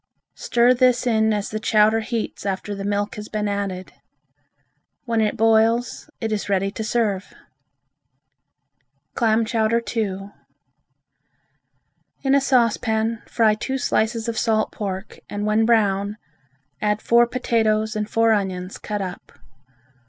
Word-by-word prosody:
Stir 240 +1 +3
this 250 0 +3
in 220 -2 +2
as 205 -1 -1
the 215 - -3
chowder 215 0 +3
heats 225 0 -4
after 195 +1 -3
the 200 0 -5
milk 205 +1 -2
has 210 0 -7
been 210 -1 -2
added. 200 -2 -4 1.1
When 230 -2 +1
it 210 -1 0
boils, 225 +2 +2
it 225 -1 -3
is 210 -1 -2
ready 195 0 +1
to 220 - -5
serve. 215 -4 -1 1.8
Clam 225 -1 +2
Chowder 225 0 +1 0.2
II 200 -2 -2 1.9
In 270 0 +2
a 280 - +4
saucepan 230 -3 +1
fry 225 -3 +3
two 265 +5 -3
slices 225 -2 0
of 230 -1 -1
salt 220 -2 +1
pork 195 -1 -6
and 205 0 -3
when 215 +1 +2
brown, 205 -2 +2 0.6
add 210 0 +1
four 235 +2 +4
potatoes 220 -3 0
and 210 0 -2
four 225 0 +3
onions 190 -2 -3
cut 210 -2 -3
up. 180 -1 -8
220 Hz, 130 wpm, -22 LUFS, 205-230 Hz, 1.9 s, a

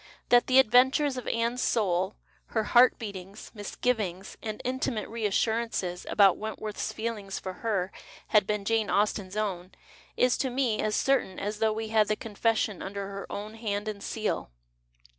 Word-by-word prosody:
That 245 0 +5
the 260 - +4
adventures 265 +3 +5
of 255 - -6
Aime's 235 +2 0
soul, 190 -3 +1 0.3
her 220 - 0
heart 245 +3 +5
beatings, 200 -2 -8
misgivings 205 -3 -2
and 215 -1 -5
intimate 255 -3 -1
reassurances 220 -4 -1
about 200 -3 +5
Wentworth's 215 -1 -4
feeling 220 -3 -4
for 190 -1 -4
her 200 -5 0 0.4
had 210 -2 +4
been 210 -1 -1
Jane 225 0 +1
Austen's 205 -1 0
own 190 -3 -2 0.4
is 250 0 +3
to 265 - 0
me 245 -4 0
as 215 - 0
certain 265 -9 +1
as 210 +1 -3
though 220 -1 +2
we 220 0 -4
had 215 -1 +3
the 215 - +1
con 210 0 -9
fession 220 -2 +1
under 200 0 -5
her 200 0 -7
own 210 +1 -5
hand 215 -2 -3
and 210 -2 -4
seal. 215 - -2
215 Hz, 160 wpm, -28 LUFS, 200-230 Hz, 0.4 s, That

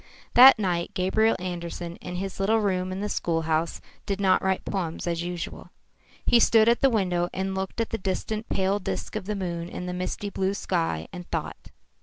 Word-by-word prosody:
That 255 +2 +10
night 180 -2 -1
Gabriel 215 +4 +2
Andersen 175 -1 -5
in 180 - -7
his 195 +2 -5
little 210 +3 +3
room 185 -3 0
in 190 +1 -4
the 210 - -1
schoolhouse 165 -3 -1 0.3
did 200 -1 -1
not 190 -2 +3
write 190 0 0
poems 175 -5 -3
as 170 -1 -1
usual. 175 -1 -5 0.6
He 240 - +5
stood 225 -1 +5
at 235 +1 +3
the 270 - +5
window 180 -6 0
and 190 +1 -2
looked 190 +3 -4
at 230 - -1
the 225 - -2
distant 210 +3 -3
pale 195 +1 +1
disk 95 - -4
of 215 -3 -3
the 210 - -1
moon 170 -3 -4
in 180 - -6
the 180 - -4
misty 185 +3 -3
blue 190 +1 -1
sky, 165 - -1
and 180 0 -8
thought. - - -4
185 Hz, 195 wpm, -26 LUFS, 175-205 Hz, 0.6 s, That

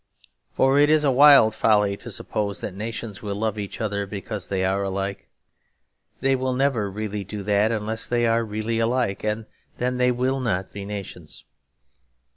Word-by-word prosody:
For 135 +1 +3
it 145 +1 +5
is 155 -1 +4
a 140 - +3
wild 135 -4 +7
folly 105 -2 +2
to - - -9
suppose 100 -2 -3
that 100 - -4
nations 110 0 -6
will 100 -2 -4
love 110 0 -2
each 100 -1 -6
other 100 -2 -2
because 100 -1 -5
they 95 -1 -1
are 95 +1 0
alike. 100 0 -3 0.9
They 135 0 +3
will 130 0 -1
never 125 -6 +1
really 105 0 -4
do 100 +1 -7
that 105 +2 +2
unless 110 0 -2
they 120 -1 +1
are 115 0 +2
really 110 +1 -2
alike; 115 -3 0
and 110 +1 -2 0.3
then 125 +1 -1
they 125 0 +4
will 130 +2 0
not 95 -7 -2
be 100 -1 -6
nations. 100 -2 -8
110 Hz, 175 wpm, -24 LUFS, 100-120 Hz, 0.9 s, wild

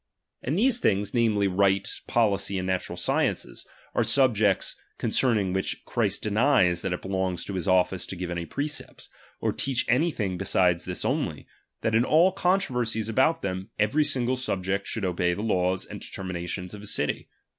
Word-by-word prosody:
And 145 +7 -1
these 245 +3 +3
things, 100 - +1
^H - - -27
namely, 110 -4 +2
right, 95 +1 +2 0.2
policy, 100 -4 +1
and 90 - -2
natural 95 -1 -2
sciences, 85 - -1 0.3
are - - +2
^H - - 0
subjects 110 -8 +2 0.2
concerning 105 -8 +1
which 95 0 -3
Christ - - -1
denies 105 -5 +3
that 95 - -2
it 90 - 0
^H - - -24
belongs 95 -2 -2
to 100 - -5
his 90 -3 -3
office 90 0 +2
to - - -6
give 90 -1 -5
any 85 -1 -3
precepts, 145 +1 -5 0.3
or - - 0
teach 130 -2 0
^H - - +3
any 155 +7 +3
thing 95 - -3
beside 90 -2 +2
this 90 +1 -5
only; - - -1 0.4
that 110 - 0
in 115 +2 +4
all 165 +7 +4
controver 185 -9 +1
^H 115 -1 -3
sies 110 0 -2
about 130 +8 +2
them, 95 0 -3
every 125 +9 +2
single 130 -3 0
subject 100 -5 -2
should 110 -4 -2
obey 90 -1 +1
^^H - - -3
the 105 - -4
laws 95 -3 +1
and - - -9
determinations 90 0 -5
of 105 - -8
his 105 - -1
city. - - -2
100 Hz, 195 wpm, -26 LUFS, 95-125 Hz, 0.4 s, in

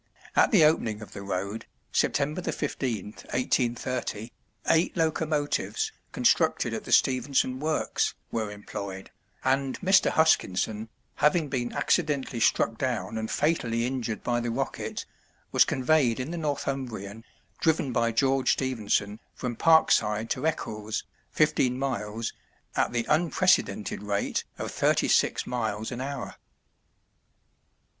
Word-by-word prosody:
At - - +5
the 200 - +5
opening 110 -9 +1
of - - -12
the - - -7
road, 100 +2 -4 0.2
September 150 +5 +1
15th, 120 - -3 0.2
1830, 120 -2 -1 0.4
eight 165 +2 +3
locomotives, 155 -2 0 0.2
constructed - - +2
at - - -4
the - - -7
Stephenson 130 0 +2
works, 155 +2 0 0.2
were 110 -2 -2
employed, 100 -2 -7 0.3
and 135 0 0
Mr. 190 0 +5
Huskinson, 110 - +2 0.3
having 150 +1 +3
been 125 -3 -2
accidentally 145 -7 0
struck 115 0 +2
down 125 -4 -2
and 110 0 -3
fatally 120 -7 +1
injured 120 -4 -3
by 120 -1 +1
the 120 0 -2
Rocket, 130 +4 -3 0.5
was - - +6
conveyed 130 -3 +2
in 130 +5 -3
the - - -3
Northumbrian, 130 -8 -3 0.4
driven 160 -5 +1
by 115 0 +2
George 135 +3 +2
Stephenson, 110 -5 -1 0.2
from 125 -2 -4
Parkside 115 -8 +4
to 160 - 0
Eccles, 110 -9 -3 0.3
fifteen 125 -1 +2
miles, 115 -4 -3 0.4
at - - +1
the 120 -1 -1
unprecedented 155 - +2
rate 100 -1 -1
of - - -4
thirty - - +2
six - - +2
miles 110 -3 -2
an 125 0 -4
hour. 140 -1 -5
125 Hz, 120 wpm, -27 LUFS, 110-145 Hz, 0.5 s, was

